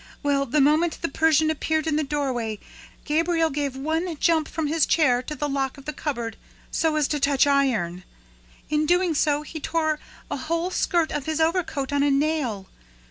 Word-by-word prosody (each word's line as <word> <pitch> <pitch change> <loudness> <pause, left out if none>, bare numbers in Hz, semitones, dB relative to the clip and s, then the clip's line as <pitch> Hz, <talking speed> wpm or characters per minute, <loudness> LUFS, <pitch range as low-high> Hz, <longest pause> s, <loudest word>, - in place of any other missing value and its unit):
Well, 280 -1 +1
the 295 +5 +1
moment 310 +4 +3
the 335 - 0
Persian 315 +1 +3
appeared 315 0 -1
in 315 -2 0
the 310 - +2
doorway, 260 -7 -2 0.5
Gabriel 325 +1 +1
gave 280 -2 -2
one 320 +4 -2
jump 320 -2 +2
from 320 -1 -3
his 310 +1 +2
chair 255 -7 +3
to 300 +4 -6
the 295 - -2
lock 275 -1 -2
of 275 - -13
the 300 - -4
cupboard, 235 -8 -4 0.3
so 320 -1 +1
as 300 -2 +2
to 295 - 0
touch 280 -1 +3
iron! 235 -12 +1 0.6
In 305 0 0
doing 355 0 +3
so, 295 0 +1
he 315 +1 -7
tore 315 0 0 0.3
a - - -1
whole 335 +6 -2
skirt 345 -3 +1
of 295 -1 -3
his 315 0 -1
overcoat 320 -4 0
on 285 - +2
a 285 - +3
nail. 275 -8 0
300 Hz, 190 wpm, -24 LUFS, 275-320 Hz, 0.6 s, moment